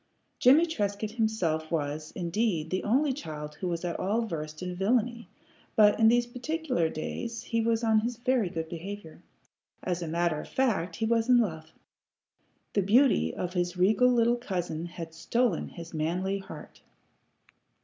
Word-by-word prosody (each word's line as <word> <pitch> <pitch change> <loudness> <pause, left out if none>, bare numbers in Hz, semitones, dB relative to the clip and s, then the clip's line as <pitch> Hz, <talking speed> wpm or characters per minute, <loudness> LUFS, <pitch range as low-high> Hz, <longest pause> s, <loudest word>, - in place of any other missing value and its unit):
Jimmie 285 +7 +6
Trescott 210 -9 -2
himself 185 -9 0
was, 155 -1 -2
indeed, 175 -2 -1
the 185 - -1
only 265 +6 +2
child 150 - -7
who 185 - -1
was 170 0 -2
at 175 - -3
all 215 +5 +1
versed 155 -4 -5
in 180 0 -4
villany, 235 +2 0 0.5
but 210 0 +5
in 225 - +6
these 240 +1 +4
particular 250 - -1
days 230 +9 -5
he 230 0 0
was 230 0 +1
on 220 -1 +4
his 235 +2 -3
very 245 -5 +1
good 160 -1 -4
behavior. 175 +1 -8 0.6
As 180 -1 -2
a 170 - -3
matter 170 -1 0
of - - -11
fact, 195 -10 0
he 225 - -1
was 230 +1 +1
in 250 - +7
love. 160 -8 -1 1.0
The 200 - +3
beauty 205 - +4
of 180 0 -3
his 175 -1 -1
regal 215 +7 +4
little 240 0 +3
cousin 175 -7 -3
had 165 -1 -8
stolen 225 +4 0
his 170 -1 -10
manly 180 +5 -1
heart. 195 - -11
195 Hz, 160 wpm, -28 LUFS, 165-235 Hz, 1.0 s, in